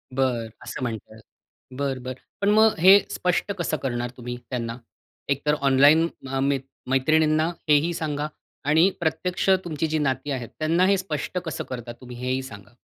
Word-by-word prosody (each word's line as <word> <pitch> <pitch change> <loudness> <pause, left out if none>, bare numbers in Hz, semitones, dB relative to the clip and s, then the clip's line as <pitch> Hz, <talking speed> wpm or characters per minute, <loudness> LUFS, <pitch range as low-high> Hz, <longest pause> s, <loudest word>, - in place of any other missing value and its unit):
बरं, 125 -4 0
असं - - -6
म्हणताय. 110 -2 -5 0.6
बरं, 135 -2 -2
बरं. 130 0 -6 0.2
पण 200 - +3
मग 220 +1 +5
हे 190 +4 +8
स्पष्ट 180 +3 0
कसं 160 -2 -1
करणार 120 -2 -2
तुम्ही 120 0 -6
त्यांना? 115 -2 -3 0.5
एक 140 0 +1
तर 150 - +3
ऑनलाईन, 140 +4 +5 0.2
अ, 135 0 -2
म 140 +1 +2 0.3
मैत्रिणींना 155 +4 +3 0.2
हेही 150 +3 +4
सांगा 150 -2 -2 0.4
आणि 160 +5 +5
प्रत्यक्ष 175 +3 -1
तुमची 160 -2 -2
जी 155 0 0
नाती 135 0 -1
आहेत, 125 -4 -4
त्यांना 165 +4 +3
हे 200 0 +4
स्पष्ट 185 -1 -4
कसं 160 - -4
करता, 120 -2 -6
तुम्ही 125 -1 -9
हेही 130 +1 -1
सांगा. 105 -4 -11
140 Hz, 165 wpm, -24 LUFS, 125-160 Hz, 0.6 s, हे